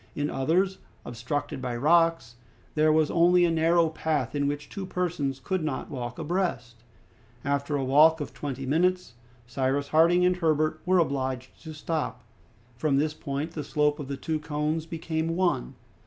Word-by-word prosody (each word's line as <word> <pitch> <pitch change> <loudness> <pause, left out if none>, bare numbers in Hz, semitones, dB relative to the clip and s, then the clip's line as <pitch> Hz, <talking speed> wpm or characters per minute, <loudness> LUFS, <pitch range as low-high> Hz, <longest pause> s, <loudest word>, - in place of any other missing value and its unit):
In 145 0 -1
others, 180 +8 +1 0.3
obstructed 125 +3 -4
by 125 -2 -3
rocks, 165 -3 +2 0.4
there 155 0 +3
was 155 -1 +2
only 175 +1 +5
a 170 - +2
narrow 165 +1 +3
path, 155 -5 -2
in 145 -1 0
which 145 +1 -3
two 195 -1 -6
persons 160 -8 -2
could 185 +2 -2
not 155 0 -3
walk 125 -3 -5
abreast. 160 -8 -2 0.7
After 140 +1 -1
a 140 - -1
walk 155 +5 +5
of 145 - -5
twenty 135 -2 -5
minutes, 180 0 +1 0.3
Cyrus 135 +3 -1
Harding 170 +3 +4
and 180 0 +2
Herbert 155 -2 +1
were 185 0 +4
obliged 130 -5 -1
to 160 - -8
stop. 155 +1 -3 0.5
From 140 +2 +1
this 150 +2 +1
point 145 +2 -4
the 155 -3 -5
slope 150 +1 +1
of 145 - -6
the 140 0 -4
two 155 +3 -2
cones 155 +1 -2
became 165 0 -2
one. 175 - 0
155 Hz, 165 wpm, -27 LUFS, 140-165 Hz, 0.7 s, only